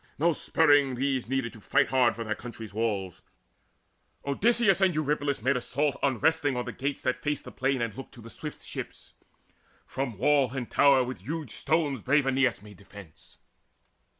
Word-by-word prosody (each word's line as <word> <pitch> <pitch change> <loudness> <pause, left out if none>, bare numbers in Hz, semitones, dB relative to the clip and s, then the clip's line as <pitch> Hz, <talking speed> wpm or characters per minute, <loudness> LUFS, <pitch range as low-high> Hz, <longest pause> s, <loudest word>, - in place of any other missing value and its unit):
No 170 +3 +3
spurring 145 -5 +3
these 130 -1 -1
Needed 135 -3 -1
to 110 - -13
fight - - +2
hard 130 -3 +3
for 115 - -5
their 110 -1 -2
country's 115 -3 -9
walls. 100 -5 -2 1.0
Odysseus 200 +6 +2
and 185 -4 +3
Eurypylus 145 -4 -1
made 135 +2 +2
assault 140 +3 -1
Unresting 145 +1 +1
on 125 - -2
the - - -4
gates 140 +1 -4
that 130 -1 -1
fated 145 -1 -2
the - - -9
plain 135 -2 0
And 115 -3 -3
looked 135 - -10
to 120 - -12
the 115 +1 -11
swift 150 -2 -8
ships. - - -8 0.7
From 130 -6 -4
wall 140 +1 +2
and 125 -3 -5
tower 140 -2 +5
With 125 -5 -6
huge 145 - -5
stones 145 -5 0
brave 140 +4 +2
Aeneas 130 -6 +1
made 105 -3 -13
defence. 100 -4 -15
135 Hz, 175 wpm, -28 LUFS, 115-145 Hz, 1.0 s, tower